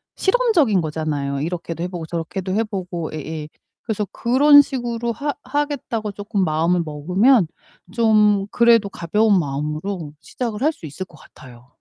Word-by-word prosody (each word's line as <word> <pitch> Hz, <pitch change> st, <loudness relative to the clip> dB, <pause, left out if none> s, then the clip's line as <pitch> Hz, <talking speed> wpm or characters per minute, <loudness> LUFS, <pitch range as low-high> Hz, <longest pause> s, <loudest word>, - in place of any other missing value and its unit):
실험적인 375 Hz, -, +3 dB
거잖아요. 150 Hz, -3 st, -2 dB
이렇게도 170 Hz, 0 st, -4 dB
해 -, -, -1 dB
보고 175 Hz, -3 st, -6 dB
저렇게도 175 Hz, +3 st, -4 dB
해 225 Hz, -, +2 dB
보고 180 Hz, -5 st, -5 dB
예예 155 Hz, 0 st, -5 dB, 0.4 s
그래서 215 Hz, -3 st, -2 dB
그런 285 Hz, +4 st, +6 dB
식으로 240 Hz, -4 st, -3 dB
하 285 Hz, +4 st, -3 dB
하겠다고 255 Hz, -6 st, -2 dB
쪼끔 200 Hz, -1 st, -2 dB
마음을 165 Hz, +3 st, +1 dB
먹으면 180 Hz, -, +3 dB, 0.5 s
좀 210 Hz, -3 st, +3 dB
그래도 230 Hz, -4 st, +4 dB
가벼운 200 Hz, +3 st, +2 dB
마음으로 150 Hz, +3 st, -4 dB
시작을 235 Hz, -3 st, -5 dB
할 310 Hz, +3 st, +2 dB
수 165 Hz, -, -12 dB
있을 155 Hz, +6 st, -6 dB
것 -, -, -18 dB
같아요. 125 Hz, -2 st, -16 dB
195 Hz, 340 characters per minute, -21 LUFS, 160-235 Hz, 0.5 s, 그런